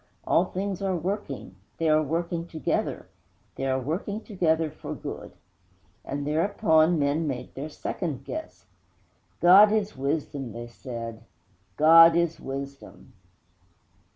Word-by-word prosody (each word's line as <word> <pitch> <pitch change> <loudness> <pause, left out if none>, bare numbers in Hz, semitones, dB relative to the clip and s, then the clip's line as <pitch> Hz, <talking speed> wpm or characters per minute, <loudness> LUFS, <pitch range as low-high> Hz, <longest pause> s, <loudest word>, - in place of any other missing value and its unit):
All - - +3
things 195 0 -4
are 190 -2 0
working 170 - -4 0.2
they 165 - 0
are 155 0 +4
working 170 +2 -2
together 160 -5 -2 0.5
they 135 - -3
are 130 0 +1
working 175 - -3
together 165 -7 0
for - - -7
good! - - -7 0.7
And 140 +1 -4
thereupon 160 0 +3
men 150 +2 0
made 130 -3 -5
their 145 +4 -6
second 150 -3 -4
guess. 315 0 -7 0.8
'God 195 +4 +8
is 215 -1 0
Wisdom,' 140 -3 -3
they 120 +1 -6
said, 115 -2 -7 0.6
'_God 165 +2 +8
is 170 -1 0
Wisdom! 140 +1 -8
160 Hz, 125 wpm, -26 LUFS, 140-175 Hz, 0.8 s, God